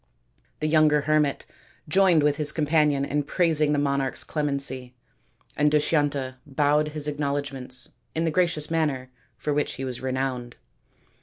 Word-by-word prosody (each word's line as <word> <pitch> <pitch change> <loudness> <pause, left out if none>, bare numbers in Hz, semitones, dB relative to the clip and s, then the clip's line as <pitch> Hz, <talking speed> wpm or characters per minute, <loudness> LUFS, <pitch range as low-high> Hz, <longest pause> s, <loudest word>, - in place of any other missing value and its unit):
The 155 - +1
younger 155 -1 +4
hermit 150 -1 +1 0.4
joined 175 -1 +4
with 145 -1 +2
his 150 -1 0
companion 150 -2 +2
in 145 +1 0
praising 155 0 +1
the 150 - +1
monarch's 140 -2 0
clemency, 140 -4 -2 0.6
and 150 0 +3
Dushyanta 145 -3 +1
bowed 150 +1 +1
his 150 -1 -5
acknowledg 145 -1 -2
ments 125 -1 0 0.2
in 160 - 0
the 165 - +1
gracious 165 -3 0
manner 140 -6 -1 0.3
for 150 - -2
which 150 0 0
he 135 - -5
was 125 -2 -5
renowned. 130 -2 -3
145 Hz, 145 wpm, -25 LUFS, 135-155 Hz, 0.6 s, younger